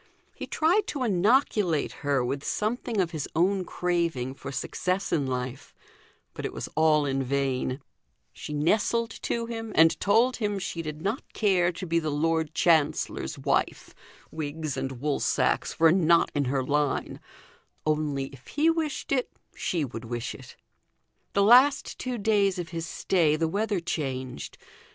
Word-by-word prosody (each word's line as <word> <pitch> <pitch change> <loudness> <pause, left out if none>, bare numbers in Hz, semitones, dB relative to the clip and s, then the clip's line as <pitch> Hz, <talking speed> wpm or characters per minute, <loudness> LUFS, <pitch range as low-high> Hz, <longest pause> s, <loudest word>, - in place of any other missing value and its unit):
He - - -7
tried 365 +7 +2
to 280 -4 -2
inoculate 205 - +2
her 140 -3 +1
with 135 +3 -3
something 225 +1 -2
of 175 -3 +1
his 155 -4 -4
own 185 +3 +2
craving 170 -9 -1
for 140 0 -8
success 185 +7 -2
in 145 -5 +1
life; 125 0 -5 0.6
but - - -7
it - - -2
was - - -5
all 155 -1 +4
in 135 -1 0
vain: 135 -1 -1 0.5
she - - -8
nestled 215 +9 +1
to 235 -1 -1
him, 225 -1 -5
and 160 0 +5
told 230 +5 +3
him 205 -3 -1
she 180 -3 -4
did 155 0 -6
not 215 +7 -3
care 185 -5 +2
to 185 +2 -6
be 170 -1 +1
the 155 -2 -2
Lord 160 +1 0
Chancellor's 155 -3 +1
wife - - -1 0.4
wigs 155 -2 -4
and 130 -2 -4
wool 145 -1 0
sacks - - 0
were 165 0 +6
not 170 -2 +4
in 145 -1 0
her 130 +1 0
line; 145 +1 -1 0.7
only 150 -3 0
if 130 -2 -15
he 310 +3 +2
wished 320 -3 -3
it, 255 -3 +1 0.2
she 165 -5 -1
would 115 -2 -8
wish 120 +2 -4
it. 130 - -12 0.8
The 200 - +3
last 255 +7 +5
two 255 -1 -3
days 200 -3 +2
of 175 -2 -4
his 165 0 -4
stay 165 -5 +1
the 165 +1 0
weather 205 +3 -1
changed. 130 - -4
165 Hz, 160 wpm, -27 LUFS, 145-205 Hz, 0.8 s, were